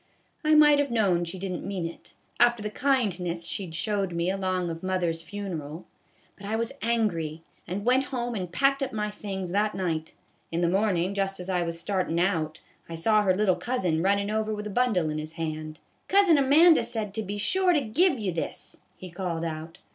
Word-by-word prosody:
I 310 0 +4
might 295 -1 +7
have 285 -1 +1
known 195 -7 +2
she 170 +3 -6
did 190 0 -4
n't 180 - -4
mean 190 -3 -3
it, 165 - -9 0.2
after 240 -2 +4
the 210 - -3
kindness 190 -11 0
she 190 +2 -3
'd 160 - -8
showed 200 -1 -1
me 170 +2 0
along 185 -2 -1
of 165 0 -7
mother's 180 -3 -1
fu 205 +5 -10
neral; 160 -4 -5 0.5
but - - -16
I 220 - -1
was 230 +1 -1
angry, 175 -9 -1 0.2
and 200 +4 -4
went 255 +2 +3
home 245 -2 -3
and 185 -5 -4
packed 275 +8 +2
up 270 -3 -2
my 210 -1 -2
things 190 -3 -5
that 210 +2 +1
night. 165 -4 -3 0.4
In 165 +1 -1
the 170 - +2
mornin', 190 -1 +1
just 195 -1 -2
as 180 +1 -4
I 180 -1 +1
was 170 -1 -3
startin' 185 -3 -1
out, 165 -4 0 0.3
I 165 - -5
saw 215 +6 +3
her 190 -3 +2
little 195 -2 +3
cousin 185 -11 -1
runnin' 200 +2 +1
over 215 0 -1
with 210 0 -6
a 210 - -4
bundle 195 -9 +1
in 155 - -3
his 155 +1 -6
hand. 155 -1 -5
' - - -40
Cousin 385 -6 +5
Amanda 300 +1 +6
said 220 -4 -3
to 220 - -2
be 205 0 -4
sure 370 - +2
to 310 -4 +3
give 275 - +2
you 200 -4 -1
this,' 170 - -5 0.2
he 185 -2 -10
called 170 -2 -3
out. 160 +1 -6
195 Hz, 215 wpm, -27 LUFS, 170-225 Hz, 0.5 s, might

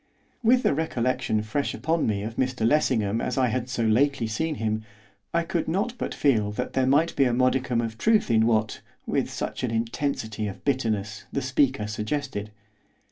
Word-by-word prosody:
With 245 +2 +4
the - - +3
recollection 130 -7 0
fresh 125 +7 -2
upon 165 +1 0
me 100 -2 -1
of 115 +2 -5
Mr 130 -3 0
Lessingham 115 -6 +2
as 125 - -2
I 130 -2 +3
had 125 +2 -2
so 125 -2 -1
lately 125 +3 +2
seen 150 +9 -2
him 110 -2 -2 0.5
I 170 0 +1
could 170 -1 -2
not 200 +9 0
but - - -3
feel 110 -8 +2
that 125 +4 -3
there 130 -1 +2
might 150 +5 +3
be 135 - +4
a 125 - +1
modicum 130 -1 +2
of 115 -1 -5
truth 220 - +3
in 110 0 +4
what, 110 -2 +1 0.2
with - - 0
such - - -4
an 125 - 0
intensity 115 -1 -2
of 100 - -8
bitterness, 110 -6 -1
the 140 - -2
speaker 130 -3 +1
suggested. 105 +1 -3
125 Hz, 185 wpm, -26 LUFS, 110-140 Hz, 0.5 s, With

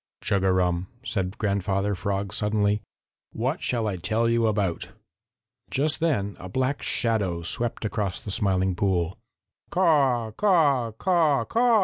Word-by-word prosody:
"Chug 100 -1 +1
a 95 - +3
rum!" 90 -1 +1 0.2
said 95 -4 -3
Grandfather 100 -1 0
Frog 100 0 -2
suddenly. 105 0 +1 0.5
"What - - -2
shall 115 -3 -1
I 95 -3 -2
tell 110 +6 0
you 115 -1 +2
about?" 100 -5 -1 0.8
Just 150 +3 +1
then 115 -12 0
a 90 - -8
black 130 +6 -1
shadow 100 -8 0
swept 115 +6 -2
across 105 -3 -2
the 100 - -6
Smiling 95 -1 +1
Pool. 90 -2 0 0.5
"Caw, 140 -10 +2
caw, 145 - +3
caw, 160 - +2
caw!" 235 -1 +3
105 Hz, 135 wpm, -25 LUFS, 95-130 Hz, 0.8 s, a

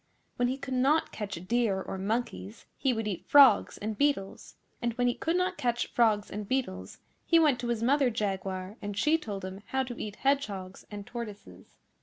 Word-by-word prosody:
When 245 - +2
he 260 +2 -1
could 270 -1 -5
not 275 +5 +2
catch 205 -2 -5
deer 230 -4 +1
or 190 0 -5
monkeys 190 - -3
he 270 - +1
would 225 -3 -2
eat 190 -5 -4
frogs 285 -2 +6
and 215 +1 -4
beetles; 275 -6 -1 0.3
and 240 -1 0
when 245 +1 0
he 245 - +3
could 330 +6 -1
not 365 0 0
catch 240 -1 -1
frogs 215 -3 +2
and 210 0 -5
beetles 255 -7 -3 0.3
he 335 - +4
went 300 -6 +4
to 240 - -3
his 235 -1 -1
Mother 270 +1 +3
Jaguar, 195 -2 -3
and 205 -1 -5
she 305 +9 +3
told 200 -8 -5
him 190 +1 -7
how 265 0 0
to 245 -2 -7
eat 210 -1 -5
hedgehogs 205 -10 -2
and 205 -1 -7
tortoises. 225 -3 -9
235 Hz, 195 wpm, -29 LUFS, 200-265 Hz, 0.3 s, frogs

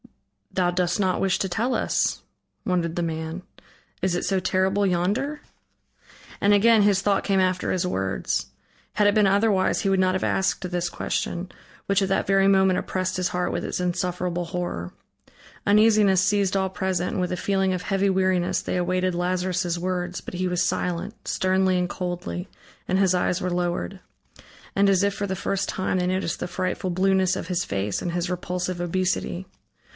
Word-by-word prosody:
"Thou 180 -2 +2
dost 175 +1 0
not 185 -2 +1
wish 195 -2 +2
to 195 - 0
tell 225 +8 -1
us," - - 0 0.4
wondered 175 -4 0
the 175 - -1
man, 160 +2 -4 0.6
"is 180 -1 +1
it 175 - -1
so 190 0 +1
terrible 190 +2 +1
yonder?" 205 +12 0 1.0
And 205 +1 +4
again 220 +2 +5
his 200 -1 +3
thought 200 -1 +1
came 195 -1 +2
after 185 -1 +1
his 180 -1 0
words. 95 - -1 0.5
Had 210 0 +3
it 205 - +4
been 210 -2 +5
otherwise, 200 -1 +2
he 200 - 0
would 195 -1 +2
not 185 0 +2
have 185 - -1
asked 190 -1 0
this 175 -1 -1
question, 175 +1 -3 0.4
which 200 0 +2
at 195 - 0
that 195 - 0
very 195 0 +4
moment 190 -1 +4
oppressed 185 0 -2
his 180 -1 0
heart 180 0 -1
with - - -2
its - - -3
insufferable 180 -1 -1
horror. 165 - -4 0.7
Uneasiness 210 -2 +5
seized 200 -1 +2
all 190 0 0
present, 185 -1 -1
and - - -1
with 180 - -1
a 180 - -2
feeling 195 0 +1
of 180 -1 -2
heavy 195 0 +1
weariness 185 -2 +1
they - - -3
awaited 185 0 0
Lazarus' 180 0 -1
words, 180 0 -2
but - - -9
he 185 +1 -1
was 180 0 +1
silent, 180 +3 -3
sternly 185 0 +2
and 180 0 0
coldly, 180 0 -4 0.4
and 185 - +2
his 190 -2 +4
eyes 180 0 +1
were 180 -2 -2
lowered. 175 - -2 0.7
And 200 0 +4
as 195 0 +3
if 200 0 +2
for 200 0 -3
the 190 - -2
first 195 0 -2
time, 185 0 -1
they 180 - 0
noticed 185 -2 -1
the 180 - -2
frightful 185 +1 -2
blueness 190 +1 +2
of - - -5
his 180 -1 0
face 100 0 -2
and 175 - -2
his 175 +1 -2
repulsive 180 0 -3
obesity. 185 +1 -1
185 Hz, 185 wpm, -24 LUFS, 180-195 Hz, 1.0 s, again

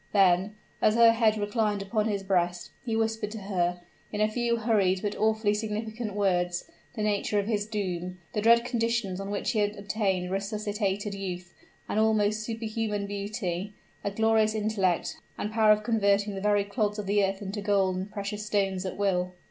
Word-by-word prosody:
Then, 195 +1 +4 0.3
as 215 - +4
her 230 0 +7
head 225 -1 +3
reclined 210 -1 0
upon 215 +2 0
his 200 -2 -1
breast, 180 -2 0
he 230 -2 -2
whispered 220 -1 0
to - - -5
her, 180 -3 -1 0.3
in 210 - -3
a 215 - +4
few 235 +2 0
hurried, 205 -5 +2
but 205 0 -1
awfully 220 -1 +2
significant 215 0 -3
words, 180 -3 0 0.3
the 215 - -2
nature 210 0 0
of 200 - +1
his 210 -1 -1
doom, 185 -4 -3 0.2
the 210 - 0
dread 235 +2 +5
conditions 230 -5 -1
on 195 0 -5
which 205 - -1
he 220 - 0
had 205 0 +1
obtained 195 -3 -1
resuscitated 205 0 -2
youth, 180 -3 -5 0.3
an 215 - 0
almost 215 -1 +2
superhuman 220 -2 -2
beauty, 200 -1 -4 0.3
a - - 0
glorious 220 +1 +2
intellect, 205 -5 0 0.2
and 210 - -3
power 220 -1 +5
of 210 0 +3
converting 205 -2 +2
the 195 - -5
very 205 0 +3
clods 210 0 -1
of 210 - -4
the 205 +1 +2
earth 195 0 0
into 205 0 -5
gold 200 -2 +2
and 190 +3 -4
precious 205 0 -4
stones 195 -3 0
at - - -5
will. 180 -2 0
205 Hz, 180 wpm, -28 LUFS, 195-220 Hz, 0.3 s, her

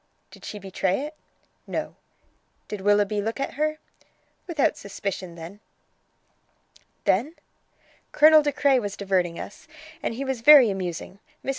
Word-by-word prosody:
"Did - - -14
she 210 - -6
betray 195 +1 -1
it?" 300 +2 -6 0.5
"No." - - -4 0.7
"Did 210 -2 -6
Willoughby 205 +1 +2
look 225 +5 -3
at 275 - -3
her?" 305 +2 -1 0.7
"Without 320 -5 +1
suspicion 195 -3 -6
then." 170 +5 -10 1.4
"Then?" 255 - +1 0.8
"Colonel 310 +1 +7
De 290 -1 0
Craye 280 -2 +3
was 205 -3 -5
diverting 185 -4 0
us, 205 - -9 0.3
and 230 - -3
he 275 +3 -4
was 265 -3 -3
very 265 -4 +8
amusing. 185 0 -5 0.3
Mrs. - - -3
210 Hz, 135 wpm, -25 LUFS, 195-280 Hz, 1.4 s, very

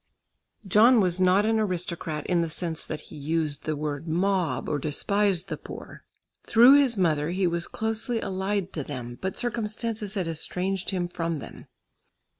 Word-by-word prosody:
John 225 +5 +6
was 185 -3 +2
not 185 +3 +4
an 220 0 +2
aristocrat 170 -6 -2
in 175 -2 +2
the 165 - -1
sense 165 0 -2
that 155 -1 -5
he - - -13
used 150 0 -2
the 155 - -1
word 150 +1 -4
"mob" 180 0 0
or 145 - -1
despised 190 +5 0
the - - -4
poor. - - -10 0.4
Through 245 +5 +7
his 255 -6 +2
mother 155 -4 +1
he 185 +2 0
was 170 0 -1
closely 225 +2 -1
allied 195 -1 -2
to 150 - -3
them, 120 -4 -7
but 190 0 -3
circumstances 220 -2 -3
had 185 -4 -1
estranged 180 +4 -1
him 180 -2 -1
from 165 -2 -3
them. - - -10
180 Hz, 165 wpm, -26 LUFS, 160-205 Hz, 0.4 s, Through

